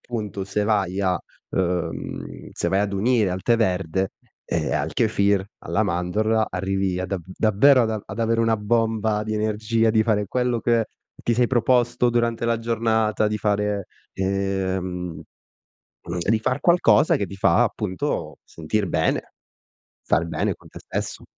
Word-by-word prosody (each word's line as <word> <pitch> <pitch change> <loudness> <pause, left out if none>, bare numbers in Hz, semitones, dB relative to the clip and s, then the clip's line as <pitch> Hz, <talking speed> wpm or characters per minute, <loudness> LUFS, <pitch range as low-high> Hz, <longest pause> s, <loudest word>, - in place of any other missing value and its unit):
punto, 105 -5 -4
se 105 +1 -1
vai 100 -3 0
a 95 -2 +2 0.3
uhm, 90 -2 -3
se - - -1
vai 95 +1 +2
ad 100 -1 -1
unire 105 0 +2
al 90 +1 -4
tè 120 -1 +3
verde, 95 -3 0 0.3
ehm, - - -1
al - - -1
kefir, 100 -1 +2
alla 110 - -1
mandorla, 105 +5 +1
arrivi 95 0 -1
a 95 - -2
da 95 +2 -2
davvero 110 +7 +4
ad 110 - 0
a 110 -2 -3
ad - - -8
avere 115 0 +1
una 115 -1 +2
bomba 110 0 0
di 110 0 -3
energia, 110 +1 +1
di 110 0 +3
fare 105 -2 +1
quello 125 +2 0
che 115 -1 +2 0.4
ti 120 - +1
sei 120 +1 +3
proposto 120 0 +2
durante 115 -1 0
la 115 -1 +1
giornata, 110 -2 +1
di 105 0 -2
fare 105 -1 0 0.3
ehm, 95 -3 -2 1.1
di 110 +1 +4
far 130 +5 -1
qualcosa 155 -11 +4
che 100 - -2
ti 100 - -9
fa 95 -2 +4
appunto 95 -4 -3
sentir 85 +6 -2
bene, - - 0 0.7
star 85 +3 +1
bene 85 - -1
con - - -18
te - - -11
stesso. - - -5
105 Hz, 155 wpm, -23 LUFS, 95-115 Hz, 1.1 s, davvero